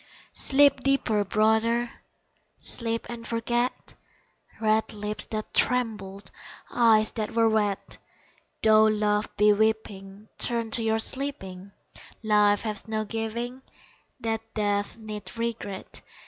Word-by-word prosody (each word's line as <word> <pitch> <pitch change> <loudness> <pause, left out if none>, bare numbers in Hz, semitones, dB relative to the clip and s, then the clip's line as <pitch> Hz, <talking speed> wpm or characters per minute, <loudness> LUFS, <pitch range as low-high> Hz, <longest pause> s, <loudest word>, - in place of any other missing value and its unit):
Sleep 280 0 +4
deeper, 250 -6 +1
brother! 220 +4 +1 0.7
Sleep 230 -1 -1
and 235 -1 -7
forget 240 +2 -2 0.7
Red 220 0 +1
lips 210 0 -2
that 215 -1 -5
trembled 215 -6 0 0.4
Eyes 220 -2 +4
that 215 -2 -4
were 230 -1 +4
wet 210 -3 -1 0.6
Though 220 0 +6
love 210 -1 +1
be 210 0 +5
weeping, 205 -1 -2
Turn 230 -2 -1
to 230 - +3
your 220 0 +1
sleeping, 200 -7 -3 0.5
Life 210 -1 +3
has 215 -1 -4
no 215 0 -2
giving 235 +4 -4 0.6
That 225 -1 -1
death 205 0 -1
need 215 0 -8
regret. 230 -4 -4
220 Hz, 110 wpm, -26 LUFS, 210-230 Hz, 0.7 s, Though